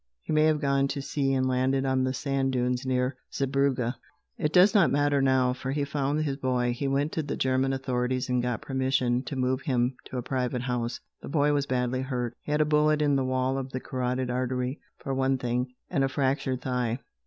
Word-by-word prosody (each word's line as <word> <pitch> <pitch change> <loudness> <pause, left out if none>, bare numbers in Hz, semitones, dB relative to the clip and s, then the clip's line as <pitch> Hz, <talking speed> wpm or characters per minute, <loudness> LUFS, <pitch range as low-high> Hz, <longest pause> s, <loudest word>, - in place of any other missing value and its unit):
He - - -3
may 155 0 +4
have 155 -1 +3
gone 140 -1 +2
to 140 0 -3
sea 140 -1 0
and 130 -1 +1
landed 130 +1 +1
on 130 -1 +1
the 130 - 0
sand 135 0 -1
dunes 125 +1 0
near 125 0 0
Zeebrugge. 135 -3 0 0.4
It 150 - -1
does 185 +6 +6
not 200 -6 +5
matter 145 0 +2
how, 130 -2 +3
for 135 +1 -4
he 145 0 0
found 145 +1 -1
his 140 -3 -2
boy. 125 -3 0
He 135 +3 -3
went 140 +3 0
to 160 - -1
the 145 - -4
German 130 +1 +1
authorities 130 -1 -1
and 125 -1 +1
got 125 -2 -2
permission 130 -2 +1
to 140 - -5
move 130 0 0
him 125 -1 0
to 130 - -6
a 125 - -2
private 125 -1 -2
house. 120 -1 -2 0.2
The - - -8
boy 145 0 +2
was 140 -1 0
badly 125 0 0
hurt. 125 -3 -3
He - - -6
had 150 +1 +2
a - - +4
bullet 150 0 +3
in 145 -2 +3
the 135 - +1
wall 130 +1 0
of 130 0 -6
the 130 - -2
carotid 125 0 -2
artery, 125 +2 -2 0.2
for 135 - -4
one 135 0 +1
thing, 125 0 -2
and 135 - 0
a 135 - +1
fractured 135 -2 0
thigh. 125 -3 -1
130 Hz, 220 wpm, -27 LUFS, 125-140 Hz, 0.4 s, does